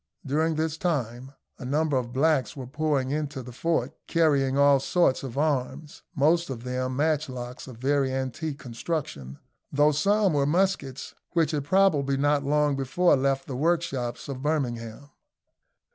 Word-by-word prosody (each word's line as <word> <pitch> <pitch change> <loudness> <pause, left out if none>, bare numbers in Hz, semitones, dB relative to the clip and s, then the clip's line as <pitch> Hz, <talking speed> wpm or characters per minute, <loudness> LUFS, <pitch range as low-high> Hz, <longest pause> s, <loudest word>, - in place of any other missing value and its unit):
During 155 +4 +1
this 160 0 -1
time 130 -6 -2 0.3
a - - -8
number 145 +3 0
of 125 -2 -1
blacks 135 -3 +1
were 130 - -5
pouring 140 -1 -1
into 145 -3 -3
the 125 - -9
fort, 165 +7 -1
carrying 140 -5 +2
all 140 -1 +5
sorts 140 0 +2
of 135 -2 -7
arms, 145 0 -2
most 165 +4 +2
of 120 -3 -6
them 130 0 -2
matchlocks 135 -5 -2
of 125 -3 -10
very 135 +1 +1
antique 135 +3 -3
construction, 120 - -5 0.3
though 145 +2 +4
some 200 +5 +2
were 140 -1 +2
muskets 155 -6 -1 0.2
which 165 -2 +2
had 145 -3 -2
probably 145 -6 +3
not 145 0 +2
long 145 0 +2
before 135 +7 +2
left 135 0 0
the 135 - -6
workshops 140 -5 -1
of 135 -2 -5
Birmingham. 135 -3 -3
140 Hz, 150 wpm, -26 LUFS, 130-155 Hz, 0.3 s, all